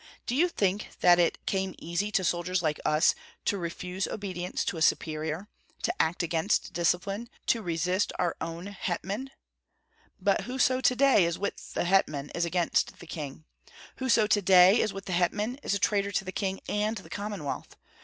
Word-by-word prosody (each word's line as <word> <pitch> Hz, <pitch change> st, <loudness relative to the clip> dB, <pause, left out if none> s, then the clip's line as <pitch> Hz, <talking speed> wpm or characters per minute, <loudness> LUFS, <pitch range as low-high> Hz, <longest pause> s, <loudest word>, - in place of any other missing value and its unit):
Do -, -, -2 dB
you 345 Hz, +6 st, +3 dB
think 200 Hz, -, 0 dB
that 175 Hz, 0 st, +6 dB
it 170 Hz, -, +1 dB
came 190 Hz, -1 st, -1 dB
easy 170 Hz, +5 st, -2 dB
to 190 Hz, -, +2 dB
soldiers 175 Hz, +1 st, 0 dB
like 155 Hz, -2 st, 0 dB
us 150 Hz, +2 st, +4 dB, 0.3 s
to -, -, +2 dB
refuse 180 Hz, +1 st, -3 dB
obedience 185 Hz, -4 st, -3 dB
to -, -, -2 dB
a -, -, -5 dB
superior, 160 Hz, +3 st, 0 dB, 0.4 s
to -, -, +1 dB
act 170 Hz, +2 st, 0 dB
against 170 Hz, +4 st, 0 dB
discipline, 195 Hz, +6 st, 0 dB, 0.2 s
to 230 Hz, -, +2 dB
resist 180 Hz, +2 st, 0 dB
our 175 Hz, -2 st, 0 dB
own 165 Hz, +2 st, -5 dB
hetman? 200 Hz, +5 st, -4 dB, 0.9 s
But -, -, +1 dB
whoso 255 Hz, 0 st, +1 dB
to 250 Hz, -, +3 dB
day 270 Hz, -7 st, +5 dB
is 170 Hz, 0 st, -1 dB
with 200 Hz, -, -5 dB
the -, -, +1 dB
hetman 155 Hz, -6 st, +1 dB
is 170 Hz, -, 0 dB
against 175 Hz, 0 st, 0 dB
the -, -, -12 dB
king. 155 Hz, -2 st, -7 dB, 0.5 s
Whoso 245 Hz, -4 st, +3 dB
to 210 Hz, 0 st, +3 dB
day 185 Hz, +3 st, +7 dB
is 215 Hz, -, 0 dB
with 195 Hz, 0 st, -8 dB
the 185 Hz, -, -3 dB
hetman 210 Hz, +8 st, 0 dB
is 200 Hz, -, 0 dB
a -, -, +2 dB
traitor 200 Hz, -1 st, +1 dB
to 195 Hz, -, 0 dB
the 185 Hz, -, -4 dB
king 190 Hz, -1 st, -2 dB
and 210 Hz, +2 st, 0 dB
the 190 Hz, -, -10 dB
Commonwealth. 205 Hz, -8 st, -5 dB
185 Hz, 180 wpm, -28 LUFS, 170-205 Hz, 0.9 s, day